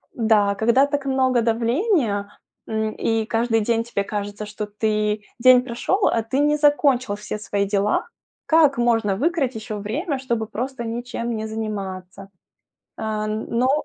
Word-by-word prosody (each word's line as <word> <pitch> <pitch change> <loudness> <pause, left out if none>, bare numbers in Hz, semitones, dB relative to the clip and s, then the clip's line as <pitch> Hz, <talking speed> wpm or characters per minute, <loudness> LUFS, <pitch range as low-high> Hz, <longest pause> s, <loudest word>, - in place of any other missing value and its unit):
да, 215 -3 +3
когда 235 +7 +3
так 285 -1 -2
много 260 -2 +2
давления, 230 - 0 0.4
м, 220 0 -1
и 225 -1 0
каждый 225 0 +1
день 230 +1 +1
тебе 230 -4 -2
кажется, 205 +1 -5
что 210 0 -5
ты, 210 0 -1 0.2
день 255 +1 +7
прошёл, 260 - 0
а 230 - +1
ты 260 +5 -1
не 295 +1 +3
закончил 280 -6 +3
все 210 +1 -5
свои 200 -1 -1
дела. 200 +1 0 0.4
Как 310 -4 +4
можно 225 -4 +2
выкроить 290 - 0
ещё 215 -1 -5
время, 275 - -3
чтобы 235 -4 -2
просто 250 +3 -4
ничем 235 0 -4
не 220 0 -4
заниматься? 195 -3 -6 0.7
Э, 215 -1 -2
ну, 235 +6 0
225 Hz, 145 wpm, -22 LUFS, 210-260 Hz, 0.7 s, день